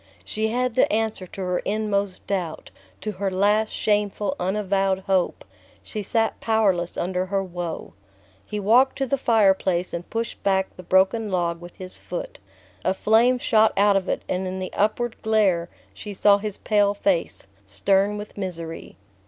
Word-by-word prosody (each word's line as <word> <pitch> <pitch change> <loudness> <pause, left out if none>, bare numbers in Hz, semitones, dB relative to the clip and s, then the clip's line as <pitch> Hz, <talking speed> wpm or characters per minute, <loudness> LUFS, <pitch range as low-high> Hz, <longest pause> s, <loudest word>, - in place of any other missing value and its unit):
She 215 +1 -1
had 250 +2 0
the 255 - +3
answer 215 -3 -1
to 195 - -8
her 180 -1 0
inmost 200 -3 -2
doubt 180 -5 -3 0.3
to 215 - -3
her 195 0 -2
last 205 +3 +2
shameful 205 -1 0
unavowed 195 0 0
hope. 190 -2 0 0.4
She 215 - -4
sat 225 +2 0
powerless 195 -6 +1
under 185 +1 -1
her 195 0 0
woe. 175 -3 -6 0.5
He 210 - -5
walked 240 +7 +4
to 270 - 0
the 275 - +1
fireplace 190 -6 +2
and 170 0 -5
pushed 230 +1 -4
back 190 -1 0
the - - -9
broken 190 +5 +2
log 170 -2 -1
with 175 0 -11
his 185 -1 -9
foot. 175 - -6 0.4
A 185 - +1
flame 230 +5 +4
shot 220 -3 +3
out 200 0 +5
of 195 -1 0
it, - - -1
and 185 +1 -2
in 185 +1 -4
the 185 0 -5
upward 220 +3 0
glare 200 -6 +2 0.2
she 205 - -8
saw 200 +1 +5
his 210 -1 -4
pale 205 -1 +2
face, 190 - -1 0.2
stern 195 - +1
with 210 0 -8
misery. 165 -4 -6
200 Hz, 165 wpm, -24 LUFS, 185-215 Hz, 0.5 s, out